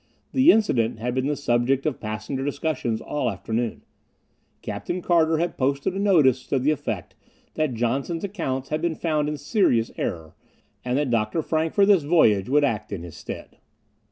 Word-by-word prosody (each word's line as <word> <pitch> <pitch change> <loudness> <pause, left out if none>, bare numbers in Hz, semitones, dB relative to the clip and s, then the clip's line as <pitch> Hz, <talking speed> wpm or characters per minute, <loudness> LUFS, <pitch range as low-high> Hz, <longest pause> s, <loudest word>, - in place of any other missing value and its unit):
The 270 +5 +6
incident 120 - +1
had 120 +2 -3
been 130 +1 0
the 150 - 0
subject 130 0 +1
of 155 -4 -1
passenger 110 +5 -4
discussion 145 -5 -2
all 145 -4 -1
afternoon. 110 +4 -3 0.8
Captain 180 - -4
Carter 165 -2 +2
had 170 +2 -2
posted 140 +5 0
a 195 - -3
notice 150 -11 +3
to 140 - +1
the 135 +4 +2
effect 115 - -4 0.4
that 155 -5 -1
Johnson's 135 +8 -1
accounts 135 -10 -3
had 155 +1 -1
been 170 -1 0
found 155 -3 0
in 150 - -3
serious 140 - +1
error, 80 -2 -4 0.5
and 125 +1 0
that 145 -3 0
Dr. 115 +7 0
Frank 160 +1 -1
for 200 - +5
this 195 -4 +5
voyage 125 - +3
would 145 +2 +4
act 110 -7 -1
in 95 -4 -5
his 85 -2 -9
stead. - - -9
140 Hz, 175 wpm, -24 LUFS, 120-160 Hz, 0.8 s, The